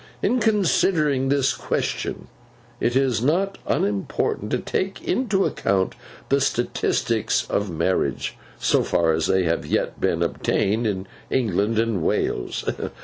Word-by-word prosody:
In 250 - +2
considering 165 - +2
this 140 -1 +2
question, - - -2 0.5
it 120 - 0
is 130 -4 +2
not 185 +9 +1
unimportant 100 -1 -1
to - - +1
take 190 +1 -2
into 215 -7 +1
account 95 -1 0 0.4
the 140 +1 +3
statistics 120 -2 0
of 100 0 0
marriage, 85 +2 -1 0.2
so - - +2
far 85 -1 +2
as 80 0 0
they 95 -1 +3
have 85 -1 0
yet - - -1
been - - +1
obtained, 110 +4 0
in 95 -2 -2 0.2
England 110 -2 +1
and 115 -5 +1
Wales. - - -1
120 Hz, 130 wpm, -23 LUFS, 95-150 Hz, 0.5 s, the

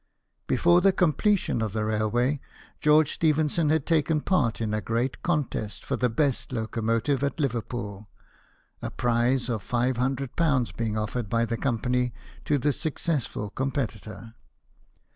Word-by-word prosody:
Before 175 +7 +4
the 195 +1 +5
completion 185 - +1
of 110 -3 -2
the 110 -1 -1
railway, 115 +6 0 0.4
George 150 0 +4
Stephenson 155 0 +2
had 160 +1 +2
taken 160 -1 +2
part 145 - +1
in 110 -2 -1
a 105 - 0
great 115 +6 -1
contest 145 -10 -2
for - - -1
the 125 - +1
best 135 +3 0
locomotive 115 +3 0
at 140 +3 -1
Liverpool, 115 -6 -3 0.7
a - - -3
prize 120 +1 +1
of 115 -4 -2
^500 125 0 0 0.3
having 140 -8 +2
been 110 -2 -2
offered 110 0 -3
by 115 +1 +2
the 115 0 -2
company 125 0 0 0.3
to 145 - +2
the 145 +2 +1
successful 145 -9 -2
competitor. 115 -4 -4
125 Hz, 140 wpm, -26 LUFS, 115-150 Hz, 0.7 s, the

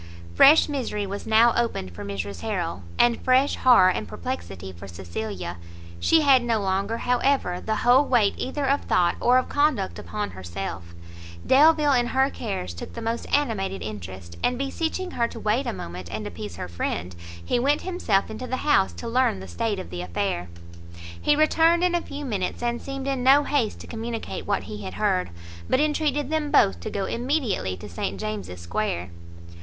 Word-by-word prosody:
Fresh 295 - +7
misery 255 -8 -2
was 200 +1 -6
now 225 +2 +5
opened 230 - -1
for - - -8
Mrs 100 0 -5
Harrel, 180 - -3 0.2
and 240 -1 +3
fresh 260 +2 +3
horror 235 -8 +6
and 105 - -3
perplexity 85 +2 -6
for 95 +2 -11
Cecilia; 90 0 -6 0.4
she 325 - +4
had 275 -4 +5
no 230 -2 +1
longer, 200 +3 -1
however, 245 -7 +1
the 220 - -1
whole 250 +3 +6
weight 235 -8 +3
either 275 +2 -3
of 280 +1 +2
thought 175 -1 +2
or 250 +1 +4
of 255 - +1
conduct 285 -10 +1
upon 210 -1 -4
herself; 85 -1 -7 0.5
Delvile 300 +1 +5
in 240 -2 +2
her 265 +2 +2
cares 190 - -4
took 85 - -8
the 230 - -6
most 230 +1 -2
animated 210 -9 0
interest, 95 -4 -8
and 245 - +1
beseeching 320 +7 -2
her 235 - 0
to 235 - -9
wait 225 +5 0
a - - 0
moment 85 - -7
and 105 0 -4
appease 85 +2 -7
her 90 - -5
friend, 85 0 -4 0.3
he 240 - +1
went 285 +4 +2
himself 225 - 0
into 250 +4 -6
the 260 - -2
house 195 -10 +3
to 235 - -7
learn 235 - +2
the 95 - -9
state 85 -1 -2
of 85 - -7
the 90 -1 -4
affair. 85 0 -2 0.7
He 295 - +3
returned 325 +3 +4
in 360 -1 +2
a 345 - +1
few 290 -2 -7
minutes, 205 -3 -3
and 240 0 -1
seemed 275 0 -5
in 270 -2 -1
no 275 +3 +6
haste 275 -7 0
to - - -10
communicate 230 0 -5
what 95 - 0
he 105 +1 -7
had 95 -2 -7
heard, 90 0 +1 0.4
but - - +3
entreated 295 -1 0
them 310 -2 0
both 95 - +4
to 85 - -5
go 195 -1 -2
immediately 235 - -1
to 105 - -9
St 95 +1 -4
James's 95 -3 -5
square. 85 +1 -2
220 Hz, 185 wpm, -25 LUFS, -, 0.7 s, Fresh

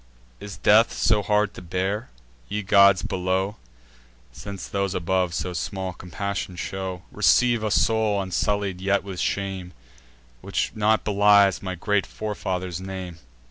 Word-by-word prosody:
Is 100 -1 -8
death 110 +3 +4
so 105 -2 +2
hard 105 0 +1
to - - -10
bear? 95 +5 -2 0.4
Ye 105 +1 -2
gods 100 -1 +5
below, 95 +2 -1 0.7
(Since 100 +9 -8
those 100 -1 -2
above 90 0 0
so 90 +1 -3
small 95 +1 -4
compassion 90 +2 -5
show,) 95 0 -5
Receive 120 -3 +3
a 110 - 0
soul 105 +2 +2
unsullied 95 0 -1
yet 100 +1 +1
with 95 -2 -7
shame, 95 -2 -3 0.7
Which - - -2
not 110 0 +2
belies 100 -1 +4
my 95 -1 -4
great 105 +3 0
forefather's 95 -4 -4
name!" 95 -3 -7
95 Hz, 135 wpm, -24 LUFS, 95-105 Hz, 0.7 s, gods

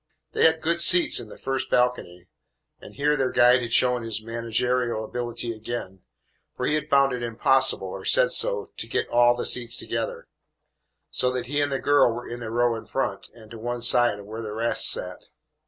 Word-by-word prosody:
They - - +2
had 160 0 +3
good 170 +1 +1
seats 175 0 +5
in 110 - -9
the - - -12
first 135 0 -3
balcony, 125 -8 -1 0.5
and - - -14
here 145 +2 +1
their 135 -2 0
guide 125 0 +4
had 120 -1 -6
shown 125 0 +2
his 115 -1 -4
managerial 115 +1 -2
ability 120 0 -5
again, 110 -4 -7 0.6
for - - -3
he - - 0
had 150 0 -2
found 140 -2 +3
it 125 - -4
impossible, 130 +3 +2
or - - -8
said - - +3
so, 480 -4 +1
to - - -6
get - - -2
all 120 0 +4
the 120 - -5
seats 120 -1 0
together, - - -4 0.8
so 125 - 0
that 125 -1 -4
he 145 +3 -1
and 145 -1 -1
the 135 - -1
girl 145 -3 +3
were 120 +2 -7
in 120 - -7
the 115 -2 -7
row 120 +1 +1
in 115 - -9
front 100 -7 -4
and 110 -2 -16
to 115 - -10
one 120 +1 -5
side 120 -2 +3
of 100 - -12
where 110 +2 -8
the 105 -2 -6
rest 115 +2 +1
sat. - - -3
120 Hz, 205 wpm, -24 LUFS, 115-135 Hz, 0.8 s, seats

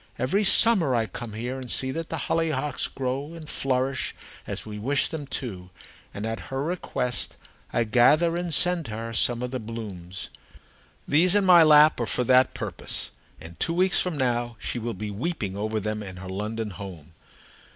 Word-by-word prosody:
Every 190 +12 +1
summer 190 - +4
I 115 -1 +2
come 110 +2 -7
here 120 +4 -4
and 130 -2 -7
see 130 +2 +1
that 165 +3 -4
the - - -3
hollyhocks 150 -4 0
grow 135 +4 -4
and 160 -2 -10
flourish 130 -1 -1 0.3
as - - -5
we 105 -1 -7
wish 135 +6 +1
them 150 -4 -5
to; 95 -10 -5 0.4
and, 100 - -5
at 115 0 -3
her 135 0 -2
request, 150 -7 -2 0.3
I 120 - +2
gather 145 +9 +4
and 175 0 -2
send 175 +1 +2
to 110 - -7
her 115 0 -5
some 120 +2 +3
of 125 - -3
the 130 - -3
blooms. 105 -5 -7 0.8
These 175 +6 +5
in 205 -1 +4
my 180 -2 +8
lap 150 -2 +7
are 120 - -1
for 125 - 0
that 130 +1 +4
purpose, - - -3 0.3
and 85 +1 -12
two 165 - 0
weeks 185 +1 +3
from 180 -4 -1
now 120 -2 0
she 120 - -3
will 115 -1 -4
be 105 +2 -5
weeping 105 - -3
over 110 +2 -2
them 105 +1 -3
in 95 -3 -8
her 95 0 -8
London 105 +3 -3
home. 85 -5 -9
125 Hz, 185 wpm, -26 LUFS, 110-155 Hz, 0.8 s, my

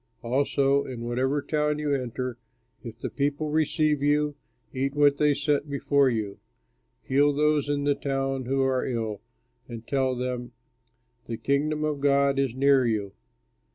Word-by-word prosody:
"Also 140 +2 +2
in 125 -3 -7
whatever 130 +4 -1
town 150 -1 0
you 150 -1 -1
enter, 125 -2 -3 0.4
if 115 -2 -8
the - - -5
people 145 +2 -1
receive 155 -1 +1
you, 145 0 +1 0.4
eat 135 +2 -2
what 145 -1 +4
they 150 0 +4
set 145 +1 0
before 140 -1 +2
you. 105 -4 -3 0.6
Heal 145 +2 +3
those 150 0 +1
in 145 -1 0
that 145 0 0
town 135 -1 -1
who 135 +2 +1
are 130 -1 +1
ill, 110 -5 -3 0.5
and 115 -1 -8
tell 130 -2 +1
them, 125 -1 -4 0.7
'The 115 - -4
Kingdom 150 +4 0
of 150 -2 -2
God 140 -1 +3
is 135 -3 0
near 135 0 +4
you.' 105 -3 -2
140 Hz, 155 wpm, -26 LUFS, 125-145 Hz, 0.7 s, what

